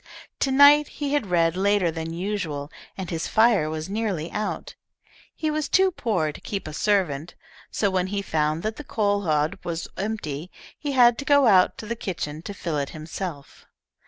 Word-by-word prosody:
To 275 Hz, -, +1 dB
night 285 Hz, +2 st, +7 dB
he 290 Hz, -1 st, -4 dB
had 290 Hz, -8 st, +1 dB
read 165 Hz, -1 st, +2 dB
later 195 Hz, -2 st, +2 dB
than 160 Hz, 0 st, -5 dB
usual, 170 Hz, -5 st, -3 dB, 0.3 s
and 190 Hz, -3 st, -5 dB
his 165 Hz, -1 st, -2 dB
fire 220 Hz, -8 st, +3 dB
was 155 Hz, 0 st, -4 dB
nearly 195 Hz, -6 st, -2 dB
out. 210 Hz, 0 st, -4 dB, 0.6 s
He 310 Hz, -1 st, -1 dB
was 305 Hz, 0 st, -2 dB
too 380 Hz, 0 st, +4 dB
poor 190 Hz, -, -1 dB
to -, -, -12 dB
keep 200 Hz, -5 st, -5 dB
a 155 Hz, -, -6 dB
servant, 175 Hz, -3 st, 0 dB, 0.3 s
so 200 Hz, -2 st, 0 dB
when 185 Hz, -1 st, 0 dB
he 200 Hz, +1 st, -2 dB
found 155 Hz, -1 st, 0 dB
that 215 Hz, +1 st, -3 dB
the 295 Hz, -, -7 dB
coal 205 Hz, -5 st, 0 dB
hod 155 Hz, +4 st, +1 dB
was 170 Hz, -1 st, -4 dB
empty 180 Hz, -7 st, -4 dB, 0.3 s
he 290 Hz, -2 st, -4 dB
had 240 Hz, -2 st, +5 dB
to 280 Hz, -, -5 dB
go 285 Hz, -1 st, +5 dB
out 190 Hz, -5 st, +5 dB
to -, -, -7 dB
the 235 Hz, +2 st, -3 dB
kitchen 160 Hz, -8 st, -4 dB
to 200 Hz, -, -7 dB
fill 165 Hz, -6 st, -2 dB
it 140 Hz, -, -2 dB
himself. 155 Hz, -2 st, -7 dB
190 Hz, 190 wpm, -24 LUFS, 160-220 Hz, 0.6 s, night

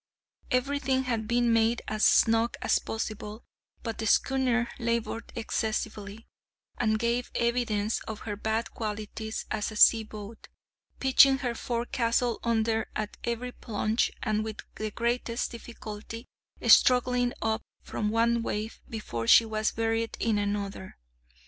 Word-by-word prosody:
Every 275 Hz, +3 st, +1 dB
thing 265 Hz, -1 st, +1 dB
had 230 Hz, -4 st, -2 dB
been 240 Hz, 0 st, +2 dB
made 225 Hz, +1 st, +2 dB
as 215 Hz, 0 st, -2 dB
snug 225 Hz, +1 st, +4 dB
as -, -, +3 dB
possible, 215 Hz, 0 st, -5 dB, 0.4 s
but 225 Hz, -2 st, -4 dB
the 220 Hz, -, -1 dB
schooner 250 Hz, -1 st, +2 dB
laboured 230 Hz, -1 st, -2 dB
excessively, 220 Hz, -1 st, -3 dB, 0.5 s
and 220 Hz, -2 st, +2 dB
gave 235 Hz, +2 st, 0 dB
evidence 235 Hz, -3 st, 0 dB
of 220 Hz, -2 st, -6 dB
her 205 Hz, -2 st, -4 dB
bad 220 Hz, +2 st, -2 dB
qualities 220 Hz, 0 st, -5 dB
as 210 Hz, -1 st, -1 dB
a -, -, -8 dB
seaboat, 215 Hz, 0 st, +3 dB, 0.5 s
pitching 265 Hz, 0 st, +6 dB
her 240 Hz, -, 0 dB
forecastle 235 Hz, 0 st, -1 dB
under 225 Hz, -1 st, +1 dB
at 215 Hz, -1 st, -4 dB
every 235 Hz, +1 st, -3 dB
plunge 220 Hz, -1 st, -1 dB
and 215 Hz, -1 st, 0 dB
with 220 Hz, -1 st, -6 dB
the 215 Hz, 0 st, -4 dB
greatest 235 Hz, +1 st, -1 dB
difficulty 230 Hz, -1 st, -8 dB, 0.4 s
struggling 250 Hz, -1 st, +5 dB
up 220 Hz, 0 st, 0 dB, 0.2 s
from 210 Hz, -, -2 dB
one 230 Hz, +1 st, +2 dB
wave 220 Hz, 0 st, -4 dB
before 120 Hz, -, -4 dB
she 230 Hz, -, +8 dB
was 215 Hz, -1 st, -1 dB
buried 225 Hz, 0 st, -1 dB
in 220 Hz, -2 st, +1 dB
another. 200 Hz, -2 st, -3 dB
225 Hz, 130 wpm, -28 LUFS, 215-235 Hz, 0.5 s, she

